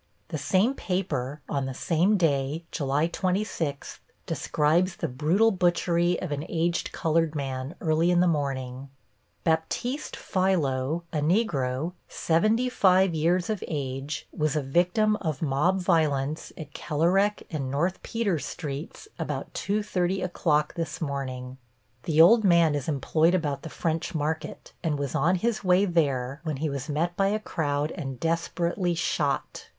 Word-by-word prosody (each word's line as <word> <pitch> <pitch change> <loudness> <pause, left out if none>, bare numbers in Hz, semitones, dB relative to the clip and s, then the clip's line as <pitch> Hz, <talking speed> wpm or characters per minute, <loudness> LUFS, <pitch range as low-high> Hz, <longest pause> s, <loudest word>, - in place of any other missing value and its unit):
The 160 - -3
same 195 - +2
paper, 155 - -2
on 140 -2 -1
the 130 - -5
same 180 +9 +2
day, 150 -2 0
July 140 +1 +1
26, 175 -5 -2 0.3
describes 170 +5 +1
the 165 - -2
brutal 160 - +2
butchery 175 -1 +2
of 180 - -5
an 145 0 -2
aged 170 +1 0
colored 165 -1 +1
man 135 +1 -4
early 160 +1 +2
in 175 -1 +4
the 180 - +4
morning: 135 -4 -2 0.5
Baptiste 170 - -1
Philo, 165 -5 0
a 155 - +1
Negro, 150 - 0 0.2
seventy 215 +9 +2
five 190 -6 +4
years 170 +3 +1
of 215 -4 -2
age, 140 -1 -4
was 155 -2 0
a 150 - 0
victim 180 +9 +2
of 155 -6 -3
mob 155 +7 +2
violence 155 -5 +1
at 150 -2 -9
Kerlerec 180 +7 +1
and 140 -5 -3
North 170 +7 -1
Peters 200 - -1
Streets 150 - -6
about - - -4
2:30 195 -3 -1
o'clock 150 -4 +1
this 165 -1 -4
morning. 130 -4 -4 0.5
The 160 -2 +1
old 220 +7 +8
man 170 -5 +5
is 145 -3 -3
employed 160 +3 +2
about 145 -6 -1
the 160 - -7
French 165 0 -2
Market, 155 +1 -3
and 155 -3 0
was 140 -2 -3
on 180 +4 +3
his 220 +4 -1
way 185 +1 +4
there 140 -6 0
when 155 -4 -2
he 150 +1 -1
was 140 +1 -5
met 165 +4 0
by 195 +1 +2
a 210 +2 +1
crowd 150 -6 -1
and 135 -7 -6
desperately 170 - 0
shot. 145 -4 -1
160 Hz, 145 wpm, -27 LUFS, 145-180 Hz, 0.5 s, old